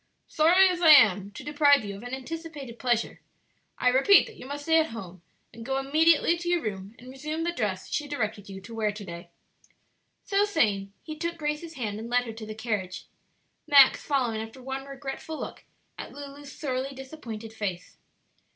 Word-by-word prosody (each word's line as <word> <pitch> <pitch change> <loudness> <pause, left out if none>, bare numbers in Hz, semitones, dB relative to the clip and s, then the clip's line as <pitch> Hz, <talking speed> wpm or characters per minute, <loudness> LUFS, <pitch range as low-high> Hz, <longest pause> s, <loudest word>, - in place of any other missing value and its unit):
Sorry 350 +5 +5
as 360 -1 -1
I 330 - +6
am 200 -8 +5
to - - -9
deprive 285 -3 +4
you 200 -1 -5
of 200 - -10
an 245 +1 -8
anticipated 285 -3 -8
pleasure, 240 -2 -1 0.6
I 250 - +3
repeat 270 +11 +6
that 460 - -12
you 255 - -11
must 290 +1 -6
stay 325 +1 +4
at 320 - +2
home; 185 -6 -9 0.3
and 230 0 -10
go 265 +3 -1
immediately 310 +5 +3
to 345 0 -3
your 350 -1 +1
room 200 0 -5
and 250 - -14
resume 305 +5 -4
the 340 - 0
dress 205 - -2
she 295 - -2
directed 215 -8 -3
you 195 0 -8
to 230 +5 -11
wear 220 -2 0
to 205 0 -9
day." 170 0 -9 1.0
So 400 0 +2
saying 210 - +1
he 310 - -7
took 340 +2 -4
Grace's 305 +2 -4
hand 215 -5 -4
and 230 +1 -7
led 245 0 +2
her 225 - -6
to 220 0 -8
the 215 - -6
carriage, 210 -5 -3 0.6
Max 280 -2 +7
following 245 -6 0
after 225 +3 -9
one 265 +1 -5
regretful 275 +3 -7
look - - -7 0.3
at - - -7
Lulu's 285 0 -10
sorely 270 -1 -3
disappointed 240 -6 -8
face. 195 -5 -5
265 Hz, 190 wpm, -27 LUFS, 220-305 Hz, 1.0 s, Max